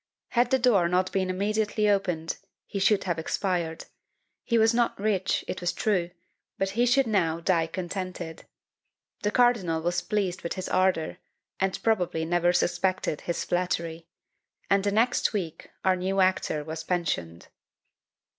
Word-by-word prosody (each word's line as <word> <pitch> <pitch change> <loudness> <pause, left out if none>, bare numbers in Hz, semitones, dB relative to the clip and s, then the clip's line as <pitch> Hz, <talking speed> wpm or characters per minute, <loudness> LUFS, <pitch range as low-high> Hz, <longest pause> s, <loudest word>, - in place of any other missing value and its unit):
Had 240 0 +2
the 265 - +4
door 230 -9 +4
not 185 +1 +1
been 190 -1 0
immediately 210 +3 0
opened, 180 -5 0 0.3
he 200 - -4
should 200 +1 +3
have 175 -3 -1
expired; 170 -1 -2 0.6
he 235 - +1
was 225 +1 +4
not 235 -3 +1
rich, 200 -3 0
it 185 - -4
was 175 - +1
true, 185 -5 0 0.5
but 195 0 0
he 240 +4 +2
should 265 +2 +4
now 175 -7 +1
die 165 -1 +1
contented! 180 -1 -5 0.7
The 210 - +1
cardinal 220 -9 +3
was 175 0 0
pleased 195 -4 -1
with 170 - -3
his 185 - -5
ardour, 185 -4 +1 0.4
and 190 0 0
probably 180 -7 +1
never 175 +1 +2
suspected 180 -3 0
his 170 - -3
flattery; 170 -2 -2 0.6
and 195 0 +4
the 200 - +1
next 230 +4 +2
week 175 -7 -4 0.2
our 185 0 +4
new 190 +2 -1
actor 185 -5 +1
was 160 +1 -6
pensioned. 150 - -2
185 Hz, 150 wpm, -27 LUFS, 170-210 Hz, 0.7 s, the